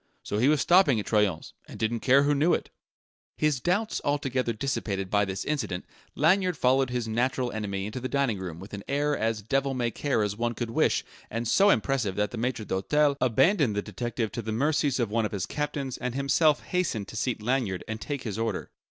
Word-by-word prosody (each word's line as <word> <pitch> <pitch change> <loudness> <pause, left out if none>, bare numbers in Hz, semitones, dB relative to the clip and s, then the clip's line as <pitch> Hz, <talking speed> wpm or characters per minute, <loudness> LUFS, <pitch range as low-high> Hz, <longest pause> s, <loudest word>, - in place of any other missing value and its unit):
So 105 - -2
he 125 - +4
was 150 -1 +3
stopping 175 - +5
at 105 - -4
Troyon's 105 -6 0
and - - -10
didn't 115 +1 -1
care 135 +4 +5
who 145 +1 +3
knew 150 +5 +3
it! - - -6 0.7
His 150 -4 +1
doubts 200 - 0
altogether 135 -4 0
dissipated 105 -6 -3
by 105 0 +3
this 95 0 -4
incident, 110 -12 -2 0.3
Lanyard 180 +2 +3
followed 130 0 +3
his 125 -2 -2
natural 125 +2 0
enemy 100 -3 -3
into 105 +5 -5
the 130 +1 -4
dining 135 -8 0
room 85 -3 -6
with 95 +3 -11
an 100 -1 -6
air 145 +1 +1
as 110 -3 -1
devil 135 +4 0
may 120 -2 0
care 135 -5 0
as 105 -1 -2
one 120 +1 -1
could 120 -2 -4
wish - - +2 0.2
and 115 +1 -3
so 200 - +5
impressive 115 - +1
that 105 0 0
the 120 - -5
maitre 120 -2 -2
d'hotel 145 +11 +2
abandoned 130 - +3
the 105 - -1
detective 120 -2 -3
to 120 - -4
the 110 0 -4
mercies 140 +2 +1
of 115 -4 0
one 115 +1 +1
of 105 - -3
his 95 -4 -2
captains 145 -3 -3
and 125 -1 -3
himself 145 +3 +3
hastened 155 - -1
to - - -10
seat 120 +1 -1
Lanyard 110 -5 -1
and 110 0 -5
take 145 -3 -4
his 110 -2 -4
order. 115 -4 -2
120 Hz, 215 wpm, -27 LUFS, 110-140 Hz, 0.7 s, stopping